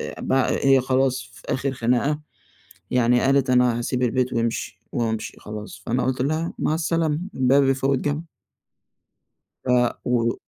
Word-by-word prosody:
أ - - -6
ب - - -2
هي 135 0 +3
خلاص، 130 0 0
في - - -15
آخر 135 +1 -1
خناقة، 125 +5 0 0.7
يعني 125 0 +3
قالت: 135 0 +2
"أنا 125 -2 +3
هاسيب 125 +1 -2
البيت 125 +1 +1
وامشي 115 -1 -2
وامشي 110 -2 -2
خلاص." 105 0 -8
فأنا 125 +2 0
قُلت 130 0 -1
لها: 155 +4 -1
"مع 155 - +1
السلامة، 160 -1 0
الباب 135 +2 +4
يفوِّت 135 0 +1
جَمَل." 145 +3 -2 1.4
ف - - -10 0.4
و - - -1
و 115 -1 +2
130 Hz, 150 wpm, -23 LUFS, 120-140 Hz, 1.4 s, الباب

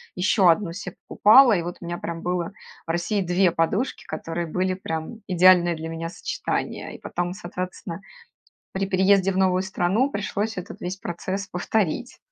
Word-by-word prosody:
ещё 185 +1 +3
одну 170 +1 +3
се 190 0 -6 0.2
покупала, 235 +3 +7
и - - -1
вот 175 +1 -5
у - - -8
меня 175 0 -3
прям 165 -1 -5
было 175 -1 -2 0.3
в - - -14
России 175 +5 0
2 180 +1 +3
подушки, 185 +10 -1
которые 165 +2 -4
были 185 +3 -1
прям 175 +4 -5
идеальное 180 -2 +5
для 160 0 -6
меня 165 0 -4
сочетание. - - -4
И - - -11
потом, 175 0 -3
соответственно, 180 -2 -6 0.7
при 195 +1 -1
переезде 195 0 +3
в 185 - -3
новую 185 -1 +3
страну 190 +7 +1
пришлось 205 0 -2
этот 180 - -7
весь 180 +2 -4
процесс 190 +2 -4
повторить. 205 +6 -1
185 Hz, 165 wpm, -24 LUFS, 170-195 Hz, 0.7 s, покупала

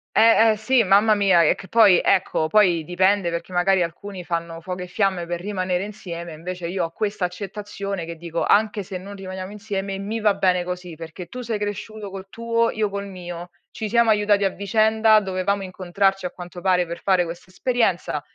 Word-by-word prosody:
Eh, 225 0 +6
eh, 215 - -1
sì, 235 +2 +3
mamma 205 +3 +5
mia, 195 -4 +4
e - - +3
che 190 - -12
poi, 210 -6 +6
ecco, 175 -4 +2
poi 175 -5 +4
dipende 185 +2 +2
perché 170 +2 -5
magari 185 +1 +3
alcuni 180 +2 -5
fanno 170 -1 -3
fuoco 180 +1 -6
e 180 - -6
fiamme 190 -2 0
per 175 0 -4
rimanere 185 -1 -2
insieme, 170 -5 -7
invece 175 +2 -6
io 180 0 -2
ho 165 - -3
questa 205 0 -3
accettazione 200 0 -4
che 165 0 -7
dico: 170 0 -3
"Anche 210 -1 +2
se 185 0 -6
non 200 +2 -9
rimaniamo 190 0 -7
insieme 200 -2 -4
mi 215 +3 -3
va 210 -2 +3
bene 185 -2 +1
così, 180 -2 -6
perché 165 +2 -8
tu 250 - -8
sei 230 -3 -3
cresciuto 205 0 -5
col 195 0 -8
tuo, 230 +1 0
io 215 -2 -1
col 200 0 -5
mio. 175 -2 -8 0.2
Ci 220 - -4
siamo 235 +1 +3
aiutati 205 -1 +3
a 195 - +3
vicenda, 215 +2 +3
dovevamo 195 +1 -1
incontrarci 190 +1 -1
a 180 - -3
quanto 175 0 -9
pare 180 -1 +2
per 170 0 -7
fare 185 -2 +2
questa 170 +2 -8
esperienza, 185 - 0
190 Hz, 195 wpm, -23 LUFS, 175-205 Hz, 0.2 s, Eh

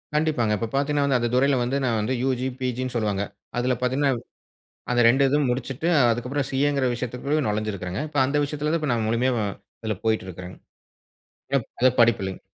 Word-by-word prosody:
கண்டிப்பாங்க. 150 -8 +1
இப்ப 115 - -2
பார்த்தீங்கன்னா 145 +1 +1
வந்து 135 -2 +3
அந்த 120 - 0
துறையுல 135 +1 +3
வந்து 125 +3 0
நான் 115 -2 +1
வந்து 110 +5 -1
யுஜி, 130 -1 0
பிஜின்னு 130 0 -2
சொல்வாங்க. 105 -3 0 0.3
அதுல 125 +1 +1
பார்த்தீங்கன்னா, 135 +2 +2 0.8
அந்த 120 0 +3
2 135 +4 +4
இதும் 145 -1 +2
முடிச்சுட்டு 130 +5 -3 0.2
அதுக்கு 120 +2 -2
அப்புறம் 140 0 -1
சிஏ 140 +2 +2
ங்கிற 135 -2 +1
விஷயத்துகுள்ள 125 +5 -2
நொழைஞ்சுருக்கிறங்க. 105 -3 -3
இப்ப 145 - -4
அந்த 140 +2 -1
விஷயத்துல 150 +2 -2
தான் 150 -5 -1
நான் 110 -2 -1
முழுமையா 125 +3 +1 0.5
அதுல 110 -3 -2
போய்ட்டுருக்கிறேங்க. 95 -5 -3 1.0
ப் - - -21
அது 130 - +6
படிப்பு 115 -3 +5
இல்லங்க. 95 -1 -5
125 Hz, 170 wpm, -24 LUFS, 115-140 Hz, 1.0 s, அது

